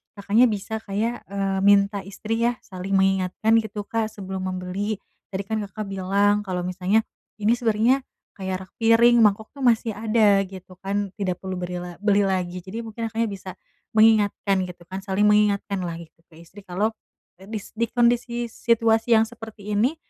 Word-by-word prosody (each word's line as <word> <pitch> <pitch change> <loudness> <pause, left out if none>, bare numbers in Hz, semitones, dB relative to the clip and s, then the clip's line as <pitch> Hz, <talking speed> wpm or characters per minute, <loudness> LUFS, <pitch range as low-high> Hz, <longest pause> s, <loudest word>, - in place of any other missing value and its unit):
Kakaknya 210 +4 +4
bisa 220 0 -3
kayak, 220 +3 -3
eee, 195 -1 -1
minta 200 0 +4
istri 215 +3 -4
ya, 240 0 +1
saling 185 +1 -6
mengingatkan 190 +2 +2
gitu, 210 -2 -5
Kak, 225 +1 -1
sebelum 190 -1 -5
membeli. 185 +3 -3 0.3
Tadi 195 0 -4
kan 220 +2 -2
Kakak 215 +2 -6
bilang 200 +2 +2
kalau 180 -2 -2
misalnya, 185 +4 +1 0.4
ini 210 +2 +3
sebenarnya, 235 +3 +2 0.4
kayak 190 -1 -4
rak - - -38
piring, 235 +1 +5
mangkok 210 +1 +3
itu 280 - -14
masih 230 -2 +3
ada, 215 -2 +3
gitu 185 -1 -12
kan, 200 +1 -1
tidak 185 -3 -1
perlu 190 0 -3
beri 180 0 -4
la 175 -1 -8
beli 205 -1 +4
lagi. 185 -2 -1
Jadi 195 +5 -6
mungkin 225 +1 -5
Kakaknya 230 +1 0
bisa, 190 -1 -8 0.5
mengingatkan 205 -3 +4
gitu 175 -1 -11
kan, 190 +1 -5
saling 190 +2 0
mengingatkanlah 200 -4 +1
gitu 165 -1 -14
ke 160 - -16
istri. 185 +5 -14
Kalau, 195 +4 -1 0.5
dis 205 +2 -7
di 230 +1 0
kondisi 240 0 +1
situasi 230 0 +2
yang - - +4
seperti 220 -3 -9
ini, 245 +9 +2
205 Hz, 165 wpm, -24 LUFS, 190-225 Hz, 0.5 s, piring